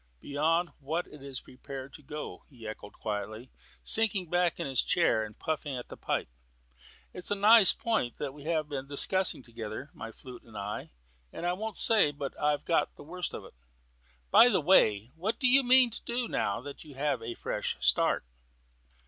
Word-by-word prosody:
"Beyond 165 - +1
what 160 +5 -2
it 150 - -14
is 135 -1 -6
prepared 135 +1 -9
to - - -10
go," 150 +2 -7
he 120 -5 -11
echoed 105 -1 -8
quietly, 110 +3 -5 0.3
sinking 200 -6 +2
back 175 -2 +2
in - - -2
his 135 -3 +2
chair 170 -10 +2
and 105 -1 -9
puffing 155 -3 -3
at 125 - -7
the - - -8
pipe. - - -2 0.9
"It's 180 - -4
a 205 - +1
nice 210 0 +7
point 220 - -1
that 140 -2 -4
we 145 0 -12
have 160 -2 0
been 140 -2 -5
discussing 165 +2 +1
together, 115 +4 -7
my 115 - -8
flute 125 +1 -11
and 110 -2 -13
I, 100 +1 -5 0.4
and - - -6
I 175 - +2
won't 215 +2 -4
say 215 -9 +5
but 140 -1 -5
that - - -13
I've 150 -1 +1
got 165 - +1
the - - -12
worst 175 +4 -4
of - - -8
it. - - -14 0.8
By 245 - +8
the - - +3
way, 120 - +4
what 190 +7 -2
do 255 - +4
you 265 +2 +6
mean 255 -1 +5
to - - -5
do 240 0 -1
now 100 - -1
that 140 +2 -9
you 150 -4 -13
have 145 +2 0
a 115 +1 -5
fresh - - -3
start?" - - +3
150 Hz, 195 wpm, -30 LUFS, 125-180 Hz, 0.9 s, By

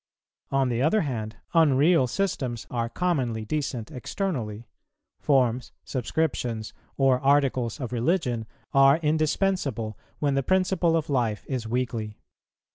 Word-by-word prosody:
On 135 -1 +2
the 120 0 0
other 185 +10 +3
hand, 115 -7 -3 0.2
unreal 155 -2 +4
systems 130 -9 -2
are 115 -1 -1
commonly 125 -8 -1
decent 135 -2 -3
externally. 120 - -4 0.5
Forms, 125 -3 +1
subscriptions, 125 -5 -2 0.2
or 135 -2 +4
Articles 135 -4 +2
of 125 -2 -4
religion 120 - 0 0.3
are 135 +1 +6
indispensable 155 - 0 0.2
when 145 -2 +1
the 135 - +2
principle 185 0 +2
of 160 -1 -2
life 115 -6 0
is 125 -4 -3
weakly. 115 -3 -2
130 Hz, 120 wpm, -26 LUFS, 115-155 Hz, 0.5 s, are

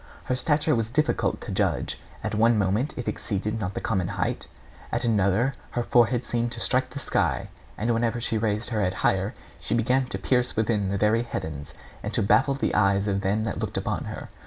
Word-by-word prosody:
Her 125 - -1
stature 150 +3 +2
was 115 -3 0
difficult 155 +5 +1
to - - -6
judge. - - 0 0.2
At 110 - -2
one 115 +2 +4
moment 105 +8 +1
it 125 - -4
exceeded 105 +2 -2
not 95 -2 -3
the - - -1
common 95 -5 0
height, - - -2 0.4
at - - 0
another 110 +3 +2 0.2
her 120 - +2
forehead 120 +1 +3
seemed 120 0 -1
to 120 - -7
strike 130 +3 +1
the - - -9
sky; 140 - 0 0.3
and 115 +2 +1
whenever 115 +1 0
she 115 -1 0
raised 110 +2 -1
her 110 -2 0
head 95 -1 0
higher, 95 +2 +1 0.2
she 110 - -1
began 125 +3 +2
to - - -3
pierce 125 -1 +1
within 105 -3 +1
the 100 - 0
very 105 +3 +3
heavens, 80 -11 -5 0.3
and - - -4
to - - +2
baffle 135 +8 +4
the 140 - -1
eyes 100 -1 +3
of 100 -1 0
them 105 +2 +1
that 105 - -3
looked - - -3
upon - - -2
her. - - -7
115 Hz, 205 wpm, -26 LUFS, 100-120 Hz, 0.4 s, one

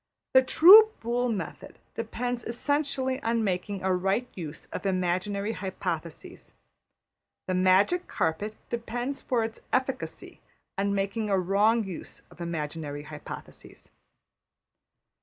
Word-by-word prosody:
The 260 - +8
true 410 +11 +8
Boole 240 +2 0
method 200 -7 -5 0.2
depends 240 +2 -3
essentially 270 +1 -1
on 230 -1 0
making 190 0 -2
a 190 0 +2
right 195 +7 0
use 160 -4 -8
of - - -3
imaginary 190 +3 0
hypotheses. 190 -3 -6 0.9
The 185 - -2
magic 190 - +3
carpet 205 +7 -2 0.2
depends 240 +4 -3
for 240 -3 0
its 225 0 -5
efficacy 260 0 -3 0.3
on 200 +1 0
making 200 +2 -1
a 195 - +3
wrong 205 +5 +3
use 190 -4 -8
of 175 - -13
imaginary 150 -3 -4
hypotheses. 150 0 -10
205 Hz, 115 wpm, -27 LUFS, 185-245 Hz, 0.9 s, The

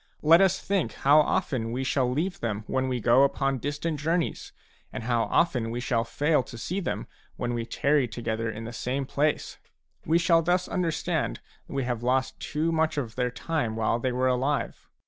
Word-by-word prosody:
Let 165 +4 +7
us 190 -1 +3
think 190 - -1
how 145 +3 +5
often 130 -6 0
we 130 +3 -2
shall 130 -1 +1
leave 170 +8 -1
them 110 -2 -3
when 130 +2 -1
we 125 -1 -1
go 120 +3 +4
upon 135 -1 +1
distant 145 +3 -3
journeys, 165 +3 -1 0.4
and - - -6
how 115 -1 +1
often 125 -9 +1
we 120 +1 -3
shall 120 -2 0
fail 150 +5 +1
to 120 - -10
see 180 - -3
them 190 - -3 0.3
when 120 0 -2
we 115 -1 -3
tarry 140 +2 +2
together 115 0 -3
in 110 +1 -6
the 115 +1 -7
same 130 +4 -2
place; 150 +3 -1 0.4
we 160 +2 +3
shall 170 -1 +4
thus 175 +2 +1
understand 175 -4 -1 0.3
that - - -9
we 135 -1 0
have 120 -2 -2
lost 130 +2 0
too 155 +3 -1
much 160 -1 +1
of 120 -6 -2
their 125 -1 0
time 125 -3 -2
while 115 +1 +1
they 130 +1 -1
were 130 +1 +1
alive. 130 +3 -1
130 Hz, 195 wpm, -27 LUFS, 120-155 Hz, 0.4 s, Let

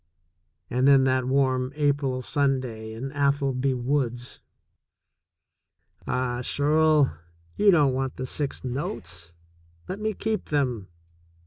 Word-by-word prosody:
And 125 +2 +1
then 135 -1 +6
that 130 -1 +1
warm 130 -1 +1
April 140 -3 0
Sunday 130 -6 -1
in 130 +5 -6
Atholby 140 -2 +1
woods! 125 -1 -2 1.7
Ah, 125 -1 -1
Shirl, 150 - +3 0.4
you 210 - +4
don't 150 -8 +4
want 130 0 -2
the 130 - -4
six 140 +2 -2
notes! 120 - -5 0.6
Let 190 +2 -5
me 215 -1 -2
keep 220 -2 -2
them. 125 -9 -1
135 Hz, 110 wpm, -25 LUFS, 125-145 Hz, 1.7 s, then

